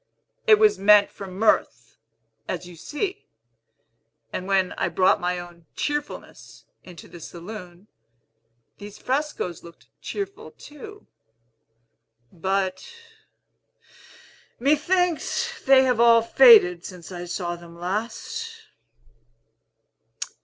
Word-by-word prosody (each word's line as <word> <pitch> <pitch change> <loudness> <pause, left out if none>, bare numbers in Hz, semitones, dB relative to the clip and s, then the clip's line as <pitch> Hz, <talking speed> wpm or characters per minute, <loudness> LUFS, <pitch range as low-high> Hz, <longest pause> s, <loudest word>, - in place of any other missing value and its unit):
"It 430 -2 +7
was 430 - +3
meant 205 +1 +5
for 195 - -9
mirth, 185 - 0 0.5
as 180 -1 -4
you 175 -1 -12
see; 300 - -5 1.1
and 185 - -4
when 190 -2 +1
I - - -2
brought 185 +2 +2
my 180 0 -1
own 175 -2 -11
cheerfulness 295 0 -5 0.2
into 175 -4 -13
the 175 - -13
saloon, 180 +2 -10 0.9
these 205 0 -10
frescos 265 - -3
looked 170 0 -16
cheerful 400 -1 -6
too. 410 +8 -12 1.3
But, 190 - -2 1.7
methinks, 360 - 0
they 265 -1 +6
have 250 -3 +1
all 230 -1 +6
faded 220 -9 +6
since 180 -2 -10
I 175 -1 -6
saw 175 0 -4
them 170 0 -14
last." 230 - -5
200 Hz, 100 wpm, -24 LUFS, 175-295 Hz, 1.7 s, It